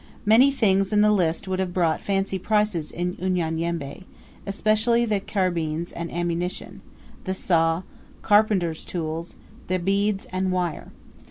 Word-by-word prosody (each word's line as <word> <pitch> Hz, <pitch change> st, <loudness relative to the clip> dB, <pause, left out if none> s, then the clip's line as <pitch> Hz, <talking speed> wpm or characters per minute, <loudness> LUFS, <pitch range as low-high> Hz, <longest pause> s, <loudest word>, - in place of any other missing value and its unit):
Many 230 Hz, +6 st, +6 dB
things 195 Hz, -6 st, +2 dB
in 210 Hz, -1 st, +4 dB
the 210 Hz, 0 st, +5 dB
list 175 Hz, -4 st, +1 dB
would 190 Hz, 0 st, -2 dB
have 185 Hz, -2 st, -2 dB
brought 165 Hz, -3 st, +1 dB
fancy 195 Hz, -1 st, -1 dB
prices 210 Hz, -6 st, 0 dB
in 180 Hz, +1 st, -3 dB
Unyanyembe, 170 Hz, -3 st, -2 dB, 0.4 s
especially 220 Hz, +4 st, +2 dB
the 210 Hz, -3 st, 0 dB
carbines 170 Hz, -5 st, -2 dB
and 170 Hz, 0 st, -6 dB
ammunition, 175 Hz, +1 st, -3 dB, 0.4 s
the 190 Hz, -1 st, -2 dB
saw, 165 Hz, -1 st, +1 dB, 0.4 s
carpenter's 205 Hz, -6 st, +2 dB
tools 165 Hz, -1 st, -4 dB, 0.3 s
the 185 Hz, -, +1 dB
beads, 195 Hz, +2 st, 0 dB
and 185 Hz, 0 st, -1 dB
wire. 180 Hz, -3 st, -2 dB
185 Hz, 135 wpm, -24 LUFS, 170-205 Hz, 0.4 s, Many